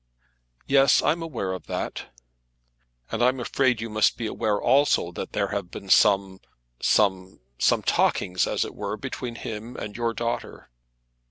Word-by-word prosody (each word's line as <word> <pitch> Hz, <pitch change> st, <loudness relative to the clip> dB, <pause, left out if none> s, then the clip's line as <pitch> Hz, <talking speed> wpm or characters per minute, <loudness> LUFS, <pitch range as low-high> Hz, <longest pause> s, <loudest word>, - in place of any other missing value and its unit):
"Yes, 135 Hz, 0 st, +4 dB
I'm 165 Hz, +3 st, +1 dB
aware 125 Hz, -13 st, -3 dB
of 95 Hz, -, -8 dB
that." -, -, -4 dB, 1.0 s
"And 115 Hz, -, -2 dB
I'm 130 Hz, +1 st, +2 dB
afraid 125 Hz, 0 st, +1 dB
you 115 Hz, -, -4 dB
must 110 Hz, -1 st, +2 dB
be 115 Hz, -, -4 dB
aware 105 Hz, -1 st, -1 dB
also 135 Hz, -10 st, +3 dB
that -, -, -7 dB
there 100 Hz, -2 st, 0 dB
have 100 Hz, -3 st, -3 dB
been 95 Hz, -, -9 dB
some, 95 Hz, -2 st, +4 dB, 0.4 s
some, 95 Hz, -3 st, +1 dB, 0.2 s
some -, -, +2 dB
talkings 90 Hz, 0 st, +1 dB
as -, -, 0 dB
it -, -, -8 dB
were, -, -, -4 dB
between 120 Hz, -2 st, -6 dB
him 115 Hz, 0 st, -7 dB
and 105 Hz, 0 st, -6 dB
your 115 Hz, -1 st, -1 dB
daughter." 115 Hz, -, -4 dB
110 Hz, 155 wpm, -25 LUFS, 100-125 Hz, 1.0 s, Yes